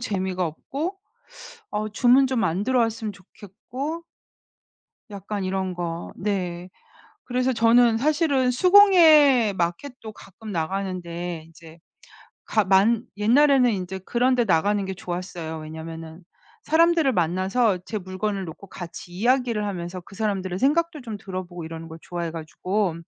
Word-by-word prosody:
재미가 190 Hz, -5 st, -2 dB
없고 290 Hz, -, -5 dB, 0.7 s
어 215 Hz, +1 st, -2 dB
주문 250 Hz, +5 st, +4 dB
좀 255 Hz, -3 st, 0 dB
안 175 Hz, +5 st, 0 dB
들어왔으면 225 Hz, -3 st, 0 dB
좋겠고 225 Hz, -, -8 dB, 1.1 s
약간 200 Hz, 0 st, -5 dB
이런 185 Hz, -1 st, -2 dB
거 170 Hz, -1 st, -5 dB
네. 185 Hz, -3 st, -3 dB, 0.5 s
그래서 255 Hz, +1 st, 0 dB
저는 230 Hz, 0 st, +4 dB
사실은 285 Hz, -2 st, +2 dB
수공예 310 Hz, -, +6 dB
마켓도 215 Hz, +7 st, -4 dB
가끔 215 Hz, +2 st, -12 dB
나가는데 175 Hz, -1 st, -4 dB
인제 165 Hz, 0 st, -16 dB, 0.7 s
가 215 Hz, -, +2 dB
만 205 Hz, +5 st, +3 dB
옛날에는 255 Hz, +4 st, +4 dB
인제 190 Hz, -2 st, -4 dB
그런 245 Hz, +6 st, +1 dB
데 245 Hz, -, +2 dB
나가는 200 Hz, +3 st, +2 dB
게 190 Hz, -, -4 dB
좋았어요. 175 Hz, -3 st, -6 dB
왜냐하면은 160 Hz, +1 st, -8 dB, 0.4 s
사람들을 325 Hz, -2 st, +3 dB
만나서 185 Hz, +5 st, +1 dB
제 220 Hz, -, -4 dB
물건을 195 Hz, +1 st, -3 dB
놓고 170 Hz, +4 st, -10 dB
같이 175 Hz, -1 st, -9 dB
이야기를 235 Hz, +1 st, +1 dB
하면서 180 Hz, -2 st, -5 dB
그 195 Hz, -, -15 dB
사람들의 195 Hz, -4 st, -2 dB
생각도 315 Hz, +4 st, +1 dB
좀 225 Hz, -4 st, -6 dB
들어보고 185 Hz, -3 st, -7 dB
이러는 165 Hz, 0 st, -8 dB
걸 160 Hz, -, -10 dB
좋아해 170 Hz, -2 st, -4 dB
가지고. 175 Hz, +3 st, -2 dB
200 Hz, 300 characters per minute, -24 LUFS, 175-245 Hz, 1.1 s, 수공예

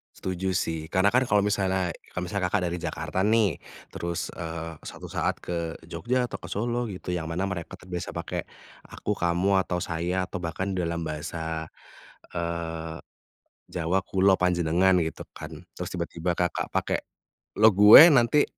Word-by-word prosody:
Setuju 95 Hz, 0 st, -2 dB
sih, 80 Hz, -1 st, -1 dB
karena 95 Hz, +4 st, +3 dB
kan 125 Hz, -, +5 dB
kalau 105 Hz, -1 st, +4 dB
misalnya 95 Hz, -3 st, 0 dB, 0.2 s
kalau 90 Hz, -, -4 dB
misalnya 90 Hz, 0 st, -1 dB
Kakak, 95 Hz, 0 st, +1 dB
dari 85 Hz, 0 st, -2 dB
Jakarta 95 Hz, -, -2 dB
nih, 105 Hz, -, +2 dB, 0.3 s
terus 85 Hz, -1 st, -3 dB
eee, 80 Hz, -1 st, -5 dB
suatu -, -, -9 dB
saat -, -, -1 dB
ke 85 Hz, -1 st, -4 dB
Jogja 120 Hz, +10 st, -1 dB
atau -, -, -7 dB
ke -, -, -9 dB
Solo 120 Hz, +2 st, -1 dB
gitu, 90 Hz, -2 st, -5 dB
yang 80 Hz, -2 st, -3 dB
mana 90 Hz, +4 st, -1 dB
mereka 95 Hz, -1 st, -5 dB
terbiasa 90 Hz, -2 st, -6 dB
pakai -, -, -4 dB, 0.5 s
"aku," 105 Hz, -, -3 dB
"kamu," 95 Hz, +1 st, +2 dB
atau 90 Hz, -1 st, -2 dB
"saya" 90 Hz, +2 st, -1 dB
atau 90 Hz, -, -6 dB
bahkan 95 Hz, +3 st, -3 dB
dalam 85 Hz, -2 st, -2 dB
bahasa, 80 Hz, +1 st, -4 dB, 0.7 s
eee, 85 Hz, -1 st, -4 dB, 0.7 s
Jawa 90 Hz, +2 st, 0 dB
kulo, 95 Hz, +1 st, +3 dB
panjenengan, 90 Hz, +1 st, +3 dB
gitu 80 Hz, -, -5 dB
kan -, -, -8 dB, 0.2 s
terus -, -, -5 dB
tiba-tiba 85 Hz, 0 st, -2 dB
Kakak, 90 Hz, 0 st, -2 dB
pakai -, -, 0 dB, 0.6 s
"lo, 110 Hz, +1 st, +7 dB
gue" 105 Hz, -, +10 dB
nanti 135 Hz, +2 st, +5 dB
90 Hz, 155 wpm, -26 LUFS, 85-95 Hz, 0.7 s, gue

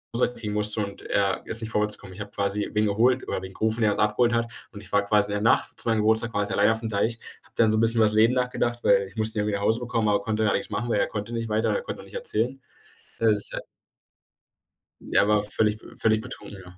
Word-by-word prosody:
Hause 125 Hz, 0 st, +1 dB
kriegen 105 Hz, -3 st, -5 dB
musste 105 Hz, 0 st, +2 dB
und 100 Hz, -, -10 dB
er 100 Hz, -1 st, 0 dB
ist 115 Hz, +1 st, -2 dB
nicht 110 Hz, 0 st, -3 dB
vorwärts 105 Hz, 0 st, 0 dB
gekommen. 95 Hz, -, -12 dB
Ich 100 Hz, -, -12 dB
habe 100 Hz, -, -7 dB
quasi 100 Hz, +1 st, -2 dB
wen 105 Hz, 0 st, +2 dB
geholt 120 Hz, +5 st, +2 dB
oder -, -, -2 dB
wen 95 Hz, 0 st, -9 dB
gerufen, 110 Hz, +3 st, 0 dB
der 105 Hz, -1 st, +4 dB
uns -, -, -3 dB
abgeholt 110 Hz, +3 st, +2 dB
hat. 115 Hz, 0 st, 0 dB, 0.2 s
Und 105 Hz, -2 st, -10 dB
ich 90 Hz, -, -2 dB
war 100 Hz, 0 st, +3 dB
quasi 105 Hz, 0 st, +2 dB
in -, -, -1 dB
der 105 Hz, -, -2 dB
Nacht -, -, -1 dB
zu -, -, -4 dB
meinem 110 Hz, -1 st, +2 dB
Geburtstag 110 Hz, +2 st, +2 dB
quasi 100 Hz, -2 st, -1 dB
alleine 105 Hz, +3 st, +4 dB
auf’m 110 Hz, 0 st, -2 dB
Deich, 110 Hz, +3 st, 0 dB, 0.3 s
habe -, -, -26 dB
dann 110 Hz, -2 st, +4 dB
so 110 Hz, -, +1 dB
’n -, -, +2 dB
bisschen 115 Hz, +1 st, +2 dB
über 110 Hz, -, +5 dB
das 105 Hz, -, +1 dB
Leben 110 Hz, +3 st, +4 dB
nachgedacht, 120 Hz, -1 st, -1 dB
weil 100 Hz, -1 st, +4 dB
ich 95 Hz, -, -17 dB
musste 110 Hz, -1 st, -1 dB
ihn -, -, +2 dB
irgendwie 105 Hz, -1 st, -1 dB
nach 100 Hz, -, -3 dB
Hause 110 Hz, +3 st, +2 dB
bekommen, 115 Hz, -3 st, -1 dB
aber 100 Hz, -1 st, +2 dB
konnte 110 Hz, +1 st, -1 dB
gar 105 Hz, -, +2 dB
nichts -, -, -2 dB
machen, 120 Hz, +2 st, -3 dB
weil 105 Hz, -, +1 dB
er -, -, +2 dB
konnte 105 Hz, +2 st, -5 dB
nicht 115 Hz, -1 st, -3 dB
weiter, 110 Hz, +1 st, +1 dB
er 485 Hz, -, -1 dB
konnte -, -, -7 dB
auch -, -, -13 dB
nicht -, -, -17 dB
erzählen. 135 Hz, -, -2 dB, 0.6 s
Äh, 115 Hz, -, +1 dB
das 105 Hz, -1 st, -1 dB
ist -, -, -5 dB
halt -, -, -5 dB, 1.4 s
der 100 Hz, -, +2 dB
war 105 Hz, -1 st, +3 dB
völlig 105 Hz, +1 st, +1 dB
äh, -, -, -14 dB
völlig 110 Hz, 0 st, +2 dB
betrunken, 100 Hz, -2 st, -9 dB
ja. 90 Hz, 0 st, -15 dB
110 Hz, 280 wpm, -25 LUFS, 105-115 Hz, 1.4 s, über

